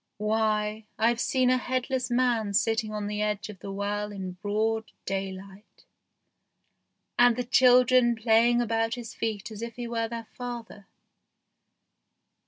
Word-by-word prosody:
Why, 215 0 0
I've 230 +1 +2
seen 255 -1 +2
a 255 - +3
headless 255 0 -2
man 240 -4 +1
sitting 225 +1 +1
on 210 -1 -3
the 210 0 -3
edge 210 0 -2
of 200 -3 -10
the 195 - -7
well 205 +1 -3
in 190 -2 -5
broad 215 +4 -2
daylight, 195 +1 -6 1.3
and 245 -1 +6
the 250 - -2
children 250 -1 +5
play 225 +1 +4
ing 240 0 +2
about 225 0 0
his 240 -2 -8
feet 220 -1 -3
as 215 0 -8
if 235 -1 -6
he 240 -1 -5
were 230 -1 -1
their 230 0 -6
father. 235 -4 -7
225 Hz, 145 wpm, -27 LUFS, 210-240 Hz, 1.3 s, and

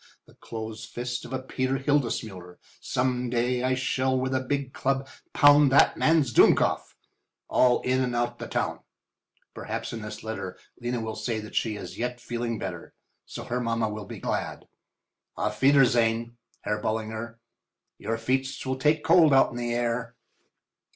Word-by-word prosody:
The - - -20
close 110 0 -7
fist 120 +2 -5
of - - -10
a 130 - -1
Peter 130 0 -1
Hildesmuller!—some 125 -1 -2
day 125 +1 0
I 130 0 +1
shall 130 0 0
with 130 +1 -1
a 130 - +2
big 135 0 -3
club 135 0 -1 0.2
pound 145 -1 +6
that 135 - +5
man's 155 -6 +2
dummkopf—all 125 +2 +2
in 130 +1 +1
and 125 -2 -1
out 120 0 -1
the - - -5
town. - - -2 0.7
Perhaps - - -5
in 115 - -5
this 110 0 -7
letter 110 -4 -5 0.2
Lena 120 0 -2
will 110 0 -4
say 110 +1 -2
that 105 - -10
she 110 -2 0
is 90 -3 -8
yet 125 +1 -2
feeling 120 -1 -3
better. 90 -4 -7 0.3
So, - - -7
her 125 +1 -2
mamma 115 -2 0
will 105 -1 -6
be - - -8
glad. - - -3 0.7
Auf 105 0 -2
wiedersehen, 120 -4 +3 0.3
Herr 105 0 -2
Ballinger—your 115 +1 -6
feets 130 +4 -1
will 130 0 -2
take 150 +3 +2
cold 160 -6 +6
out 135 - +5
in 120 - -7
the 120 0 -2
night 120 - -1
air." 115 0 -2
120 Hz, 155 wpm, -27 LUFS, 110-130 Hz, 0.7 s, pound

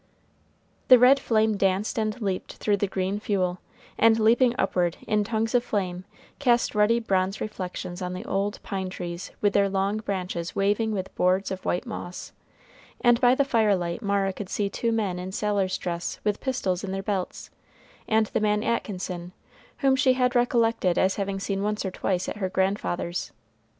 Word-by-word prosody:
The 255 - +9
red 255 +3 +6
flame 220 -2 +2
danced 195 +3 +1
and 215 +2 -1
leaped 195 -4 -3
through 205 -1 0
the 205 - 0
green 190 +1 -2
fuel, 185 -4 -1 0.4
and 225 0 +5
leaping 235 +3 +4
upward 180 -3 0
in 210 -1 +2
tongues 220 +2 -1
of 245 -1 +3
flame, 185 -5 -2 0.3
cast 245 -4 +2
ruddy 210 +2 +3
bronze 195 -3 0
reflections 180 -3 -5
on 180 0 -3
the 185 +5 -6
old 200 0 -1
pine 190 -3 -3
trees 175 -1 -6
with 205 -1 +2
their 200 -1 +3
long 195 +2 0
branches 185 -5 -4
waving 205 +3 +1
with 190 -3 -4
boards 185 +2 +1
of 190 0 -5
white 175 - -1
moss, 180 -6 -7 0.7
and 240 -1 +4
by 250 0 +5
the 280 - +2
firelight 205 -8 +1
Mara 200 -2 0
could 190 -1 -7
see 200 -1 -1
two 230 +2 -1
men 205 -6 -1
in 185 +1 -5
sailor's 200 -2 0
dress 170 -1 -4
with 210 -1 -1
pistols 200 -9 -1
in 190 - -4
their 195 0 -3
belts, 195 -3 -3 0.6
and 220 0 +3
the 215 - -2
man 210 0 +1
Atkinson, 180 -6 -3 0.5
whom 270 -2 +4
she 260 -1 +4
had 250 -1 +1
recollected 230 -6 +2
as 190 0 +2
having 195 -1 -2
seen 195 0 -2
once 210 0 -1
or 190 - -2
twice 185 -1 -1
at - - -4
her 190 -3 -2
grandfather's. 190 -2 -1
200 Hz, 175 wpm, -26 LUFS, 185-220 Hz, 0.7 s, The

